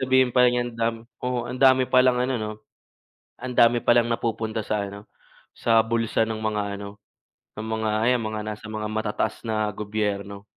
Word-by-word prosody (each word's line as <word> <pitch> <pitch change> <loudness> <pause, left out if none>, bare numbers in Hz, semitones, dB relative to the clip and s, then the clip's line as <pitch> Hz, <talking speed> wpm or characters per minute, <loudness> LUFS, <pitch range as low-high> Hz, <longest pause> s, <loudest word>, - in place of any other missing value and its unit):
sabihin 130 -1 +3
pala 125 -1 +5
niyan, 120 0 -1
dam 115 0 -1 0.2
oo, 125 -1 -2
ang 130 - -6
dami 130 -1 +6
palang 130 -1 +4
ano 130 +1 0
'no, 110 0 -3 0.9
ang 125 0 -5
dami 120 +1 +5
palang 120 0 +4
napupunta 110 -1 -2
sa 105 -1 -1
ano, 100 +1 -11 0.5
sa 115 -1 +3
bulsa 115 -1 +1
ng 110 -1 -3
mga 105 -1 -1 0.2
ano, 100 0 -9 0.6
ng 110 - -4
mga 110 0 -1 0.2
ayan 125 -1 +3
mga 110 0 -3
nasa 105 0 -6
mga 105 0 -3
matataas 110 0 -2
na 110 -1 0
gobyerno. 100 -1 -3
115 Hz, 170 wpm, -24 LUFS, 105-125 Hz, 0.9 s, dami